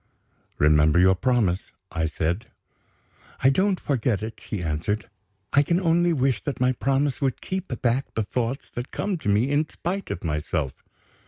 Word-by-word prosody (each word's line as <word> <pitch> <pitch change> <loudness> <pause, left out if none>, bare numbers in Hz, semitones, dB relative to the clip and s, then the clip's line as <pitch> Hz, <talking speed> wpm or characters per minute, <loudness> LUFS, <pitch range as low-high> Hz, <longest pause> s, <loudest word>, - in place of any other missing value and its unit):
"Remember 75 +2 +4
your 95 +1 +6
promise," 100 -3 0 0.2
I 80 -2 0
said 85 +7 -2 1.0
"I 135 - +7
don't 190 +5 +2
forget 120 -6 0
it," 110 +1 -6
she 100 -5 -4
answered. 80 +7 -2 0.5
"I 140 - +6
can 170 +4 +1
only 175 -1 +3
wish 135 -6 +1
that 145 - -3
my 125 0 +3
promise 135 +2 0
would 135 -2 0
keep 190 0 -4 0.2
back 125 +3 +1
the 110 - +1
thoughts 125 +4 -3
that 120 +2 -5
come 195 -4 -2
to 105 - -2
me 110 +7 +3
in 150 +1 +1
spite 190 +3 -4
of - - -4
myself." 75 -4 -2
125 Hz, 165 wpm, -25 LUFS, 90-145 Hz, 1.0 s, I